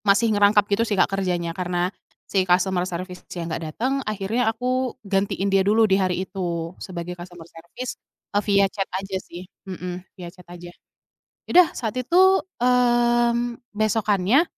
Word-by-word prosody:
...masih 215 Hz, +2 st, +3 dB
ngerangkap 205 Hz, 0 st, +4 dB
gitu 205 Hz, -, +2 dB
sih 205 Hz, -, 0 dB
Kak 185 Hz, -, +2 dB
kerjanya 180 Hz, -3 st, -1 dB
karena 180 Hz, +1 st, -2 dB, 0.3 s
si 190 Hz, -2 st, 0 dB
customer 180 Hz, 0 st, +2 dB
service-nya 180 Hz, -1 st, -6 dB
nggak 165 Hz, -, -3 dB
datang, 255 Hz, +4 st, -1 dB, 0.2 s
akhirnya 215 Hz, +3 st, 0 dB
aku 250 Hz, +3 st, -1 dB
gantiin 195 Hz, 0 st, 0 dB
dia 195 Hz, -, +5 dB
dulu 215 Hz, +3 st, +4 dB
di 195 Hz, -2 st, +3 dB
hari 185 Hz, 0 st, 0 dB
itu, 175 Hz, -3 st, -4 dB
sebagai 175 Hz, -1 st, -6 dB
customer 175 Hz, -1 st, -10 dB
service, 170 Hz, +10 st, -8 dB, 0.3 s
eee, 205 Hz, -, +2 dB
via 200 Hz, -1 st, +4 dB
chat 195 Hz, -2 st, -3 dB
aja 195 Hz, 0 st, -4 dB
sih, 175 Hz, +2 st, -10 dB, 0.2 s
mhm, 180 Hz, -1 st, -5 dB, 0.2 s
via 180 Hz, -2 st, -8 dB
chat 180 Hz, -2 st, -17 dB
aja. 175 Hz, 0 st, -10 dB, 0.8 s
Ya -, -, -9 dB
udah 360 Hz, -3 st, +8 dB
saat 230 Hz, 0 st, -4 dB
itu, 370 Hz, +9 st, +4 dB, 0.2 s
mmm, 240 Hz, -1 st, +2 dB, 0.2 s
besokannya 215 Hz, -, +2 dB
195 Hz, 155 wpm, -23 LUFS, 180-230 Hz, 0.8 s, udah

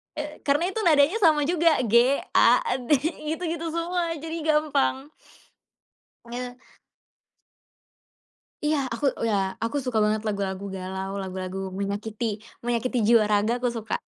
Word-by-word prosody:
E 300 Hz, 0 st, -6 dB
karena 295 Hz, +5 st, +2 dB
itu 390 Hz, +4 st, -3 dB
nadanya 310 Hz, +3 st, +4 dB
sama 310 Hz, -3 st, +5 dB
juga, 335 Hz, -3 st, +3 dB
G-A-D. 250 Hz, -, +3 dB, 0.4 s
Gitu-gitu 335 Hz, 0 st, -3 dB
semua, 335 Hz, +1 st, -1 dB
jadi 325 Hz, +2 st, -5 dB
gampang. 300 Hz, -3 st, +1 dB, 1.3 s
Eh. 250 Hz, 0 st, -4 dB, 2.2 s
Iya, 305 Hz, 0 st, +2 dB, 0.2 s
aku, 260 Hz, +5 st, -3 dB, 0.2 s
ya, 210 Hz, -, +2 dB, 0.3 s
aku 230 Hz, -, -2 dB
suka 250 Hz, -3 st, -1 dB
banget 215 Hz, 0 st, +1 dB
lagu-lagu 200 Hz, -1 st, -3 dB
galau, 190 Hz, +1 st, -5 dB
lagu-lagu 190 Hz, 0 st, -5 dB
menyakiti, 205 Hz, +3 st, -3 dB, 0.4 s
menyakiti 240 Hz, +1 st, -1 dB
jiwa 220 Hz, 0 st, +5 dB
raga, 210 Hz, +3 st, +1 dB
aku 245 Hz, 0 st, 0 dB
suka. 225 Hz, -2 st, -5 dB
250 Hz, 115 wpm, -25 LUFS, 210-310 Hz, 2.2 s, sama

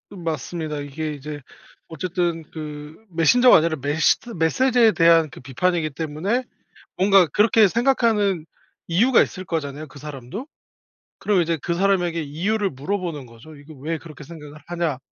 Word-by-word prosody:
맞습니다. 160 Hz, -2 st, -4 dB
이게 150 Hz, +2 st, -5 dB
이제 145 Hz, +1 st, -8 dB, 0.5 s
어쨌든 170 Hz, 0 st, -2 dB
그 150 Hz, -1 st, -8 dB
메신저가 230 Hz, +10 st, +5 dB
아니라 160 Hz, 0 st, +1 dB
메시드 155 Hz, -, +1 dB
메시지에 230 Hz, +7 st, +3 dB
대한 165 Hz, -1 st, +4 dB
그 -, -, -13 dB
비판이기 155 Hz, +5 st, -1 dB
때문에 165 Hz, -, -2 dB, 0.5 s
뭔가 195 Hz, -1 st, +5 dB
그렇게 210 Hz, +4 st, +4 dB
생각하는 220 Hz, -, +1 dB, 0.4 s
이유가 230 Hz, +10 st, +4 dB
있을 185 Hz, 0 st, -5 dB
거잖아요 155 Hz, -3 st, -4 dB
그 145 Hz, 0 st, -14 dB
사람도. 150 Hz, -, -8 dB, 0.7 s
그럼 200 Hz, -4 st, +2 dB
이제 165 Hz, 0 st, 0 dB
그 170 Hz, -, -2 dB
사람에게 175 Hz, -3 st, +1 dB
이유를 195 Hz, +7 st, -1 dB
물어보는 150 Hz, -1 st, -4 dB
거죠. 115 Hz, +7 st, -14 dB
"이거 145 Hz, +2 st, -14 dB
왜 155 Hz, +5 st, -4 dB
그렇게 155 Hz, -2 st, -12 dB
생각을 150 Hz, -1 st, -11 dB
하냐?" 170 Hz, -5 st, -2 dB
165 Hz, 345 characters per minute, -22 LUFS, 150-195 Hz, 0.7 s, 메신저가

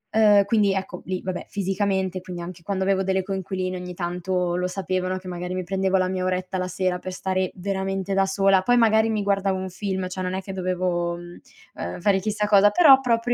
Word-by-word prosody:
uhm, 210 Hz, -2 st, +6 dB
quindi 205 Hz, -2 st, +2 dB
ecco, 190 Hz, -1 st, -4 dB
lì 185 Hz, -1 st, -3 dB
vabbè, 185 Hz, -1 st, -4 dB
fisicamente, 190 Hz, -1 st, -1 dB
quindi 180 Hz, -1 st, -7 dB
anche 175 Hz, 0 st, -8 dB
quando 190 Hz, +1 st, -2 dB
avevo 190 Hz, 0 st, +2 dB
delle 190 Hz, 0 st, 0 dB
coinquiline 185 Hz, -1 st, -3 dB
ogni 180 Hz, 0 st, -7 dB
tanto 180 Hz, 0 st, -2 dB
lo 180 Hz, +1 st, 0 dB
sapevano, 185 Hz, 0 st, -2 dB
che 185 Hz, 0 st, -10 dB
magari 180 Hz, 0 st, -4 dB
mi 185 Hz, -, -2 dB
prendevo 190 Hz, +1 st, 0 dB
la 185 Hz, -, +1 dB
mia 185 Hz, 0 st, -2 dB
oretta 185 Hz, 0 st, -2 dB
la 185 Hz, -, -2 dB
sera 185 Hz, 0 st, -1 dB
per 185 Hz, -, -6 dB
stare 185 Hz, 0 st, -1 dB
veramente 195 Hz, 0 st, -2 dB
da 195 Hz, 0 st, +3 dB
sola, 195 Hz, -1 st, +3 dB
poi 245 Hz, +5 st, +3 dB
magari 220 Hz, -1 st, +4 dB
mi 215 Hz, -2 st, -1 dB
guardavo 195 Hz, -1 st, +1 dB
un 190 Hz, 0 st, -4 dB
film, 190 Hz, 0 st, -3 dB
cioè 185 Hz, +1 st, -5 dB
non 185 Hz, 0 st, -2 dB
è 190 Hz, -, -3 dB
che 195 Hz, -, -7 dB
dovevo, 180 Hz, -2 st, -1 dB
mhmm, 175 Hz, 0 st, -11 dB, 0.3 s
uhm, 85 Hz, -, -6 dB
fare 195 Hz, +1 st, +2 dB
chissà 210 Hz, +2 st, -1 dB
cosa 205 Hz, 0 st, +6 dB
però 280 Hz, -2 st, +7 dB
propri 240 Hz, -1 st, +1 dB
190 Hz, 215 wpm, -24 LUFS, 185-195 Hz, 0.3 s, però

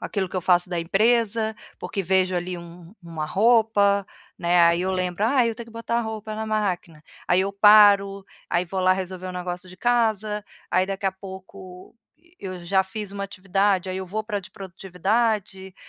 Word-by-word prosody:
aquilo 195 Hz, -4 st, -3 dB
que 185 Hz, -, -6 dB
eu -, -, 0 dB
faço 175 Hz, 0 st, +2 dB
da 175 Hz, -1 st, -1 dB
empresa, 220 Hz, +4 st, +1 dB, 0.2 s
porque 195 Hz, -, -4 dB
vejo 185 Hz, 0 st, +1 dB
ali 180 Hz, 0 st, -3 dB
um 170 Hz, +2 st, -12 dB
uma 165 Hz, -2 st, -5 dB
roupa, 205 Hz, -1 st, +3 dB, 0.3 s
né, 175 Hz, 0 st, +3 dB
aí 170 Hz, 0 st, +4 dB
eu 190 Hz, -, -1 dB
lembro: 185 Hz, +1 st, -2 dB
"Ai, 245 Hz, -1 st, +3 dB
eu -, -, -6 dB
tenho 235 Hz, 0 st, -9 dB
que 230 Hz, -, -15 dB
botar 230 Hz, +1 st, -2 dB
a -, -, +1 dB
roupa 220 Hz, -1 st, -5 dB
na 220 Hz, +1 st, -4 dB
máquina.", 185 Hz, -7 st, -2 dB, 0.3 s
aí 175 Hz, +1 st, +4 dB
eu 195 Hz, +1 st, -1 dB
paro, 200 Hz, -1 st, +6 dB, 0.2 s
aí 175 Hz, +1 st, +1 dB
vou 185 Hz, +2 st, -4 dB
lá 185 Hz, 0 st, +4 dB
resolver 185 Hz, -1 st, -5 dB
um -, -, -6 dB
negócio 180 Hz, +1 st, -5 dB
de 185 Hz, -, -13 dB
casa, 215 Hz, -2 st, 0 dB, 0.3 s
aí 185 Hz, +1 st, +2 dB
daqui 195 Hz, 0 st, -5 dB
a 190 Hz, -, +1 dB
pouco 190 Hz, -1 st, -12 dB, 0.4 s
eu 185 Hz, -2 st, -7 dB
já 190 Hz, +2 st, +2 dB
fiz 210 Hz, 0 st, -6 dB
uma 200 Hz, 0 st, -4 dB
atividade, 195 Hz, 0 st, 0 dB
aí 185 Hz, -, -3 dB
eu 190 Hz, 0 st, -5 dB
vou 215 Hz, +4 st, -3 dB
para 210 Hz, -1 st, -4 dB
a -, -, -2 dB
de 185 Hz, -, -13 dB
produtividade, 195 Hz, +1 st, -2 dB
190 Hz, 195 wpm, -24 LUFS, 180-215 Hz, 0.4 s, paro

